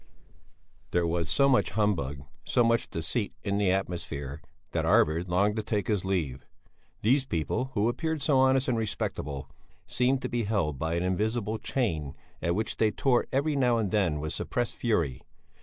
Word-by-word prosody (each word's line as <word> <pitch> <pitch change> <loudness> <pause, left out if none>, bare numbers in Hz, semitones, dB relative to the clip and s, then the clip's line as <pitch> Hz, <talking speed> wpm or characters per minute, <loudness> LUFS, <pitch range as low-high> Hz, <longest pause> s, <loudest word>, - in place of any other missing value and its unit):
There 90 -1 +1
was 85 -1 -1
so 140 - +4
much 130 -2 +3
humbug, 75 -10 0 0.2
so 120 - +2
much 115 0 +2
deceit 100 +7 -2
in 100 -1 0
the 100 -2 +2
atmosphere 80 -6 -3 0.3
that 80 - 0
Arvid 90 -2 +3
longed 100 +4 +2
to - - +1
take 105 -2 -1
his 105 -4 0
leave. 80 -9 -1 0.6
These 130 +5 +3
people, 85 - -1
who 105 +1 +2
appeared 160 +4 -1
so 140 -3 +3
honest 130 0 +4
and 120 -3 +1
respectable, 75 -9 -3 0.4
seemed 130 +1 +1
to - - 0
be 120 -2 -1
held 85 -10 0
by 80 +2 -1
an 85 - 0
invisible 110 +4 -1
chain 80 - -2 0.3
at 85 0 0
which 110 +3 -1
they 110 - +3
tore 125 +2 +1
every 145 +3 +1
now 125 -4 +3
and 105 -4 -1
then 90 -8 +1
with 75 +1 -3
suppressed 120 -1 -2
fury. 85 - 0
105 Hz, 175 wpm, -28 LUFS, 85-120 Hz, 0.6 s, so